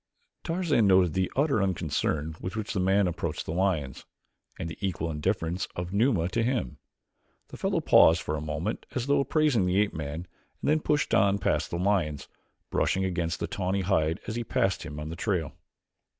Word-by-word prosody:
Tarzan 165 - +2
noted 95 -4 +4
the 95 +1 0
utter 140 -6 +2
unconcern 80 -4 -1
with 90 +3 -5
which 110 -1 -3
the 95 - -1
man 95 +2 +3
approached 85 -3 -3
the - - -4
lions, 85 -7 -1 0.5
and - - -4
the 85 - -6
equal 85 -4 -2
indifference 85 +2 -1
of 90 +1 -4
Numa 100 -6 +2
to 95 - 0
him. 115 - -1 0.7
The - - -9
fellow - - 0
paused 80 +1 +6
for 75 - -2
a 75 - -4
moment 80 +7 -3
as 125 -2 -1
though 140 +1 +3
appraising 140 - +2
the 90 +1 +1
ape 105 -1 +1
man 80 +1 -5 0.4
and - - -32
then 155 - +3
pushed 150 -1 0
on 100 -1 +4
past - - 0
the 85 - -3
lions, 90 -6 0 0.4
brushing 95 0 +1
against 85 -3 -2
the - - -1
tawny 95 +1 -1
hide 85 -2 +1
as 110 - -4
he 120 - -2
passed 95 -3 0
him 75 -2 -7
in 75 +1 -5
the 80 - -5
trail. 90 -5 -1
95 Hz, 190 wpm, -28 LUFS, 80-105 Hz, 0.7 s, paused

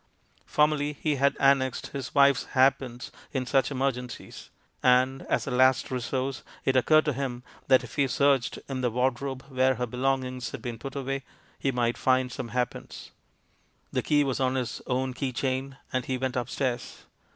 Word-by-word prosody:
Formerly 150 -1 +2
he 150 0 -1
had 140 +1 +2
annexed 135 -2 +2
his 135 -1 -5
wife's 140 -2 +5
hairpins 130 -2 +2 0.2
in 130 -2 -1
such 135 +1 +2
emergencies; 130 -3 -4 0.3
and, 130 +1 +3
as - - +1
a 140 - -4
last 130 +1 +3
resource, 130 +1 -2 0.2
it 135 - +2
occurred 155 +4 +5
to 150 - +1
him 125 -2 -4 0.2
that, 130 -1 +5
if 120 - -10
he 140 -1 +3
searched 135 -2 +2
in 130 -2 -3
the 125 - +2
ward 125 +2 0
robe 135 -2 -4
where 130 0 +2
her 125 +1 -1
belongings 130 0 -1
had - - -7
been 120 -2 -5
put 135 +3 -7
away, 135 0 -2 0.4
he 135 - +1
might 120 -1 0
find 130 -1 +2
some 120 - -5
hairpins. 125 +1 -4 0.8
The - - +1
key 145 -1 +3
was 135 -2 -1
on 130 0 +1
his 125 -3 -3
own 130 0 0
key 130 +1 -2
chain, 130 +1 -2 0.2
and 130 -1 0
he 130 +1 -2
went 130 0 -2
upstairs. 125 0 -3
130 Hz, 175 wpm, -27 LUFS, 125-135 Hz, 0.8 s, wife's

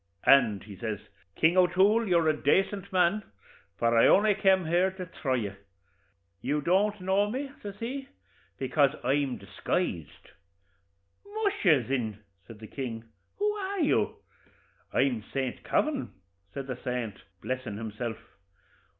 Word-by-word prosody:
'And,' 115 -8 +5
says 110 -3 -2 0.4
he, - - -20
'King 165 +3 +4
O'Toole, 195 +5 +4
you're 170 -3 +3
a 155 - +3
decent 195 +6 +1
man, 185 +3 +3 0.6
for 115 0 +2
I 115 - +6
only 210 +1 +5
kem 190 -3 +3
here 175 +4 +3
to 190 -1 -7
thry 135 -6 -2
you. 105 -5 -2 0.9
You 150 - 0
don't 200 +6 +2
know 195 +3 +2
me," 270 +4 -4
says 200 -1 -7
he, 265 +4 -4 0.5
"bekase 135 +2 +2
I'm 135 0 +1
disguised.' 95 - -3 0.9
'Musha! 405 - +2
thin,' 115 -4 -2 0.3
says 115 - -11
the 110 - -10
king, 115 -2 -5 0.3
'who 415 +1 +1
are 400 -1 -4
you?' 295 - +2 0.8
'I'm 125 -5 +1
Saint 130 -2 -3
Kavin,' 290 -3 0 0.4
said 135 -1 -5
the 130 -2 -5
saint, 120 -6 -3 0.2
blessin' 130 -5 -3
himself. 110 +1 -4
160 Hz, 135 wpm, -28 LUFS, 125-200 Hz, 0.9 s, I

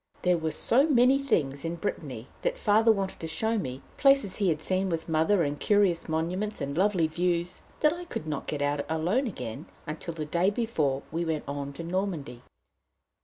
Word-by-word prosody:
There 180 -1 +3
were 160 0 -1
so 270 - +3
many 260 0 +5
things 145 - 0
in 165 +1 -2
Brittany 170 +4 -5
that - - -1
Father 220 - +4
wanted 195 -3 -2
to 165 - -4
show 220 +7 0
me 130 -7 -5
places 275 -9 +4
he 200 -3 +2
had 155 -2 0
seen 185 +3 0
with 165 -2 -3
Mother, 165 +4 +3
and 145 -1 -2
curious 200 -6 +2
monuments, 180 +7 -1
and 140 -1 -3
lovely 185 -2 +3
views, 175 +2 -1 0.2
that 300 0 +4
I 350 +1 -7
could 245 - -5
not 150 -3 -4
get 145 -1 -2
out 145 0 0
alone 175 - +1
again 130 - -6 0.2
until 160 +1 -5
the 155 -2 -3
day 175 +5 +2
before 160 - -1
we 165 +2 -1
went 160 -2 -2
on 140 0 -4
to 165 - -7
Normandy. 170 -8 -3
170 Hz, 190 wpm, -28 LUFS, 155-205 Hz, 0.2 s, many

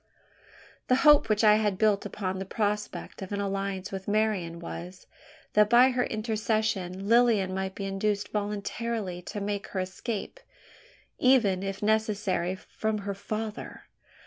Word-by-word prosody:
The 255 - +4
hope 295 -6 +7
which 215 +1 +2
I 210 -1 +7
had 210 -3 0
built 210 -1 +2
upon 190 -2 -4
the - - -2
prospect 210 0 -3
of 190 - -7
an 200 - -2
alliance 195 -1 -3
with 190 -1 -6
Marian 205 -5 0
was, 175 +2 -8 0.5
that 210 0 +5
by 245 +3 +6
her 250 -1 +1
intercession 215 -4 -1
Lilian 225 -5 +4
might 190 0 -3
be 200 - -4
induced 200 +1 -1
voluntarily 210 -1 -3
to 205 +4 -6
make 205 0 -3
her 190 - -4
escape 200 - -4 0.8
even, 230 -8 +4
if 195 +1 -4
necessary, 210 -4 +1
from 215 +3 -3
her 200 - -2
father! 215 +2 -5
205 Hz, 145 wpm, -28 LUFS, 190-220 Hz, 0.8 s, hope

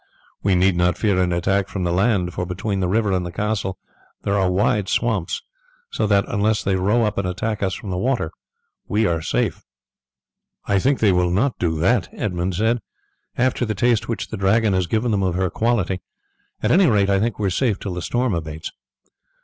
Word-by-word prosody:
We 100 -2 +2
need 90 +1 +3
not 90 0 +2
fear 100 -4 +2
an 90 -1 +1
attack 95 +3 +1
from 95 - -4
the 85 - 0
land, 95 -2 +1
for - - -3
between 95 +3 -3
the 90 - 0
river 105 +2 +1
and 90 -1 0
the 85 - -5
castle 100 -1 -2 0.5
there 100 - 0
are 95 -2 +2
wide 100 +1 +1
swamps; 110 -8 -1 0.5
so - - 0
that 100 -1 +3
unless 105 +1 +1
they 95 - +1
row 105 +6 +2
up 105 -2 0
and 95 - -1
attack 105 +4 -3
us 95 -2 0
from 100 - -7
the 90 - -2
water 120 -7 0 0.6
we 110 +2 +1
are 85 -4 0
safe." - - -1 1.0
"I 100 -1 +2
think 135 +7 +2
that - - +1
they 100 - +6
will 90 -1 +2
not 110 +9 0
do 80 -3 0
that," - - +2
Edmund 90 -2 -2
said, 110 +5 +1 0.6
"after 130 0 +1
the 110 -3 -1
taste 120 +1 +1
which 115 -4 -3
the - - -5
Dragon 100 +2 +2
has 95 -2 +1
given 110 +5 0
them 100 -2 +1
of 90 -2 0
her 95 -1 0
quality. 100 -6 0 0.6
At - - +2
any 185 +1 +5
rate 100 -4 +3
I 100 - +3
think 115 +1 -1
we 105 - -2
are 95 - +1
safe 110 +1 +1
till 95 - -4
the 90 - -4
storm 120 +3 0
abates." 80 -2 -5
100 Hz, 215 wpm, -21 LUFS, 90-110 Hz, 1.0 s, they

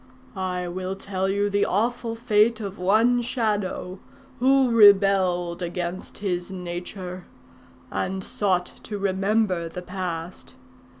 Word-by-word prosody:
I 180 -2 -2
will 185 +2 -4
tell 190 -1 -2
you 200 +1 +1
the 205 0 +1
awful 230 +3 0
fate 225 0 +3
of 200 -3 -6
one 225 +6 +3
Shadow 210 -6 -2 0.4
who 265 0 +4
rebelled 195 -5 +5
against 175 +1 -4
his 180 -2 -3
nature, 180 0 -6 0.6
and 190 0 -2
sought 185 -4 0 0.2
to 210 - -5
remember 195 -2 0
the 180 +2 -7
past. 180 -2 -6
190 Hz, 115 wpm, -24 LUFS, 180-210 Hz, 0.6 s, rebelled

